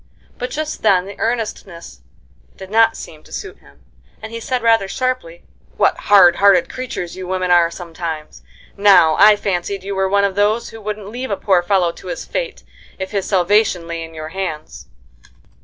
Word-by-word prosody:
But 250 - -3
just 310 0 -4
then 185 -4 +3
the 200 0 -10
earnestness 205 - -4 0.6
did 190 0 -11
not 225 +1 +4
seem 155 -1 -10
to - - -20
suit 405 - -7
him, - - -22 0.4
and 220 - -9
he 230 - -5
said, 250 +1 -3
rather 225 -4 +3
sharply: 255 -8 -3 0.3
"What - - +3
hard 195 -4 +7
hearted 195 -3 +4
creatures 245 -9 -6
you 185 -1 -7
women 185 -1 -1
are 175 -1 +5
sometimes! 165 -3 -7 0.3
Now, 190 -6 +5
I 210 +1 +8
fancied 195 -1 -3
you 200 +1 -4
were 190 0 0
one 200 +1 +2
of 200 -1 +1
those 210 +4 +1
who 225 - -11
wouldn't 210 -1 -5
leave 250 +4 -5
a 200 - -1
poor 190 -3 +2
fellow 175 -1 +1
to - - -13
his - - -5
fate, - - -4 0.3
if 190 0 -5
his 200 -3 -2
salvation 190 -1 +2
lay 170 0 -5
in 165 0 -11
your 155 0 -7
hands." 155 - -6
195 Hz, 185 wpm, -18 LUFS, 175-215 Hz, 0.6 s, I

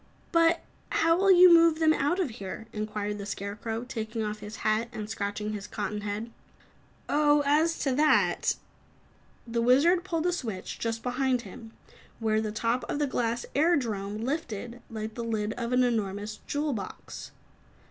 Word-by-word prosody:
"But 335 0 +4 0.3
how 330 0 +3
will 390 +3 +2
you 360 -1 +9
move 335 -1 +6
them 315 -1 +4
out 305 +6 0
of 335 -10 0
here?" 200 +1 -7
inquired 210 -1 -3
the 200 - -5
Scarecrow, 210 +3 -4
taking 225 -3 -4
off 210 0 -3
his 210 +1 -8
hat 215 +2 +1
and 210 -1 -5
scratching 210 0 -3
his 205 -1 -5
cotton 210 -1 -3
head. 210 +3 -4 0.8
"Oh, 295 0 +4
as 310 +4 +3
to 270 - +1
that 305 +3 +3 0.4
" - - -33
The 235 - +3
Wizard 295 +9 +4
pulled 335 -3 -2
a 355 - +2
switch 220 - -5
just 225 0 -2
behind 255 0 0
him, 225 +3 -11 0.4
whereupon 220 -1 +1
the 215 - -2
top 235 +2 +1
of - - -1
the 295 - +1
glass 240 -3 -1
airdrome 225 - +1
lifted, 245 -5 -4
like 220 -1 -5
the 235 - -5
lid 220 -2 -1
of 235 0 -4
an 250 0 +4
enormous 210 -3 -1
jewel 290 0 -1
box. 200 -5 -7
235 Hz, 170 wpm, -28 LUFS, 215-295 Hz, 0.8 s, you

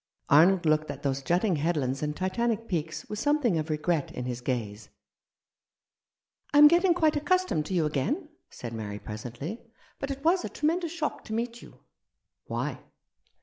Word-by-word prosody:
Arnold 170 +5 +6
looked 155 0 +2
at - - -6
those 135 -1 0
jutting 175 +4 +1
headlands 140 -4 0
Rough 150 - 0
Justice. 150 - -7
and 185 0 0
Titanic 230 -1 0
peaks 160 -4 -3
with 210 - -5
something 275 - +2
of 155 +1 -4
regret 150 0 0
in 125 - -5
his 125 -1 -4
gaze. 110 -5 -3 0.8
" - - -42
I - - +7
am 295 0 +11
getting 345 +2 +4
quite 315 -3 +3
accustomed 305 - +1
to 190 - -2
you 165 -3 +2
again," 235 - -1 0.2
said 120 -1 -8
Mary, 105 -2 -5
presently; 120 - -6 0.2
" - - -31
but 275 - -3
it 275 0 -5
was 350 +2 +4
a - - -4
tremendous 330 +2 0
shock 325 -3 -3
to 220 - -6
meet 235 +1 -3
you." - - -15 0.6
"Why?" - - -3
175 Hz, 185 wpm, -28 LUFS, -, 0.8 s, am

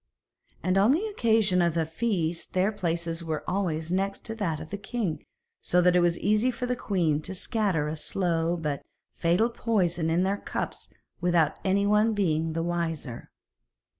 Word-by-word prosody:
And 185 +1 +2
on 215 +7 +5
the 355 +8 0
occasion 220 - +2
of 170 -1 +1
a 165 - +2
feast 165 -2 -2
their 185 +3 +2
places 170 -4 -2
were 160 -2 -3
always 170 -4 -1
next 195 +4 -2
that 170 -8 -2
of 155 0 -9
the 205 - -3
king, 205 -5 -3 0.4
so 180 - 0
it 180 0 +5
was 175 0 +2
easy 215 +5 +2
for 250 0 -3
the 250 0 0
queen 170 -10 0
to 190 +4 -5
scatter 195 -6 0
a 155 - -3
slow 170 0 0
but 150 -4 -2 0.3
fatal 180 +8 +1
poison 175 -9 0
in 170 +3 +2
their 195 +2 +1
cups - - -5 0.3
without 175 -3 +2
anyone 205 +3 +3
being 160 -5 +1
the 165 0 -1
wiser. 165 -7 -3
180 Hz, 165 wpm, -27 LUFS, 165-205 Hz, 0.4 s, on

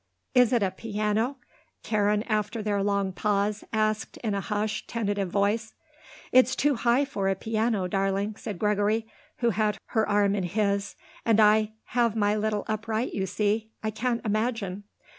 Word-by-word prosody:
"Is 250 -2 +5
it 235 -4 +3
a 190 - +1
piano?" 215 +5 -1 0.5
Karen, 210 -1 +1
after 215 0 -1
their 205 -1 0
long 200 -1 0
pause, 205 +2 0
asked 215 -1 0
in 215 -3 0
a 200 - -1
hushed, 215 +2 -2
tentative 205 -4 -1
voice. 210 +4 0 0.6
"It's 255 +1 +5
too 290 +1 +2
high 245 +3 +2
for 200 -8 -1
a 195 - +1
piano, 220 -1 0
darling," 195 +2 0
said 210 -3 -6
Gregory, 210 +2 +1 0.4
who 235 -1 +3
had 210 +1 0
her 220 -2 +1
arm 205 -1 +3
in 205 - 0
his 200 +1 0 0.3
"and 225 -2 +3
I 215 0 +4 0.2
have 235 -2 +2
my 205 -1 +2
little 210 -1 -1
upright, 220 +2 -2
you 190 -1 -1
see. 210 +3 0
I 215 - -1
can't 235 +2 -2
imagine." 215 -3 -1
215 Hz, 160 wpm, -27 LUFS, 205-225 Hz, 0.6 s, Is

